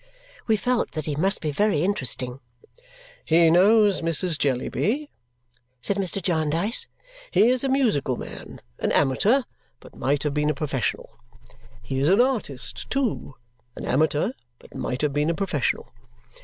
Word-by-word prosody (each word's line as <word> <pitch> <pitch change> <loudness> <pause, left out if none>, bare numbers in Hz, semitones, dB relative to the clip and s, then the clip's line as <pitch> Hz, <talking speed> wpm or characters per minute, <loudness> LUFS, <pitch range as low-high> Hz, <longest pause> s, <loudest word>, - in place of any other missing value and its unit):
We 220 - +4
felt 245 +4 -1
that 155 -2 -4
he 150 - -2
must 190 +6 +1
be 155 - -1
very 170 0 +1
interesting. 130 - -1 0.8
"He 165 0 +4
knows 205 +3 +5
Mrs. 165 0 +1
Jellyby," 210 - -1 0.7
said 195 +11 -2
Mr. 195 0 -1
Jarndyce. 170 +4 0 0.4
"He 230 - +4
is 255 0 +1
a 270 - 0
musical 220 - +1
man, - - -9 0.2
an - - 0
amateur, 200 - +3 0.4
but - - -16
might 140 +1 -1
have 150 -2 -1
been 150 0 +1
a 150 - 0
professional. 135 -5 -3 0.6
He 135 - -3
is 140 +4 +2
an 195 +4 +4
artist 230 - -1
too, 255 - -2 0.4
an - - -7
amateur, 150 - +1 0.3
but - - -18
might 125 +4 -3
have 145 -2 +1
been 150 +2 +1
a 170 - 0
professional. 160 -10 -2
165 Hz, 150 wpm, -24 LUFS, 145-210 Hz, 0.8 s, knows